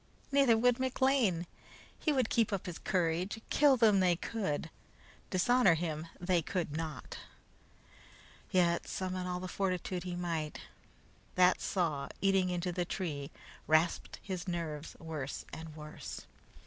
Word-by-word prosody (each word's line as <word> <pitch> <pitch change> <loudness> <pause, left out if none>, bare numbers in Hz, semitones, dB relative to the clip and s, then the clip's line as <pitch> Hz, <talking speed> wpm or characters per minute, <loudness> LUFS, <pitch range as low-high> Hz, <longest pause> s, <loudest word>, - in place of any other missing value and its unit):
Neither 275 -5 +5
would 245 +2 +3
McLean. 260 -9 +2 0.5
He 310 - +1
would 260 -5 +1
keep 230 -3 +3
up 200 -3 -2
his 175 -2 -5
courage. 180 +3 0
Kill 285 -2 +5
him 215 -4 +5
they 180 -2 +4
could; 170 -5 -3 0.6
dishonor 195 0 +4
him 160 -1 -3
they 180 -1 +2
could 165 -2 -2
not. 160 -2 -5 1.3
Yet, 170 -2 +2
summon 185 -1 -3
all 180 0 -2
the 185 - -5
fortitude 185 -1 -1
he 180 -1 -4
might, 165 -4 -2 0.8
that 180 0 +5
saw 155 -7 0
eating 195 -2 +3
into 180 0 -1
the 175 +1 -1
tree 155 -6 -3 0.4
rasped 155 +2 +2
his 185 -1 -4
nerves 165 -3 -4
worse 155 -4 -5
and 160 -1 -8
worse. 150 0 -7
180 Hz, 135 wpm, -33 LUFS, 165-195 Hz, 1.3 s, Neither